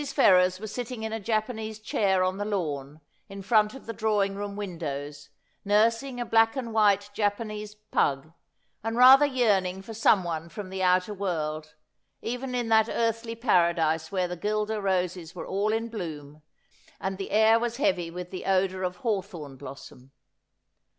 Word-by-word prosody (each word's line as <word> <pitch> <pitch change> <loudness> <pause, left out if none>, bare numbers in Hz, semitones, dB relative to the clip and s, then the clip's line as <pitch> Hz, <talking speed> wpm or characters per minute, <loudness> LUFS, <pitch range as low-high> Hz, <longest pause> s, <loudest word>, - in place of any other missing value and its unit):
Ferrers 185 -5 +4
was 215 0 -7
sitting 245 -2 -5
in 220 0 -3
a 225 - -2
J 220 +2 -3
apanese 220 0 -2
chair 195 -3 +1
on 185 +1 -1
the - - -1
lawn, 155 -8 -3 0.3
in 195 0 -8
front 215 +2 +3
of 270 - -11
the 230 - -5
drawing 210 -2 +1
room 200 0 -5
windows, 145 -7 -6 0.3
nursing 230 +5 +2
a 240 - -2
black 225 +1 +3
and 240 -4 -4
white 205 -2 +3
Japanese 210 0 -2
pug, 155 -8 -1 0.5
and 225 +1 -2
rather 265 +3 +8
yearning 200 -8 +1
for 225 - -8
someone 175 -7 +1
from 185 +2 -8
the 190 0 -4
outer 185 +2 +2
world, 155 -6 -3 0.4
even 250 +2 -4
in 240 -2 -1
that 220 0 +4
earthy 230 0 -1
paradise 170 -8 +2
where 185 -2 0
the 180 - -5
guelder 210 +3 -2
roses 180 -3 -1
were 175 - -6
all 200 +3 0
in 225 +1 -1
bloom 155 -9 -7 0.6
and 190 0 -4
the 195 - -4
air 220 +2 +5
was 235 0 -2
heavy 275 - +1
with 180 +1 -7
the 185 - -6
odour 190 -1 +1
of 180 -1 -2
hawthorn 185 - -3
blossom. 130 -1 -11
200 Hz, 165 wpm, -27 LUFS, 180-225 Hz, 0.6 s, rather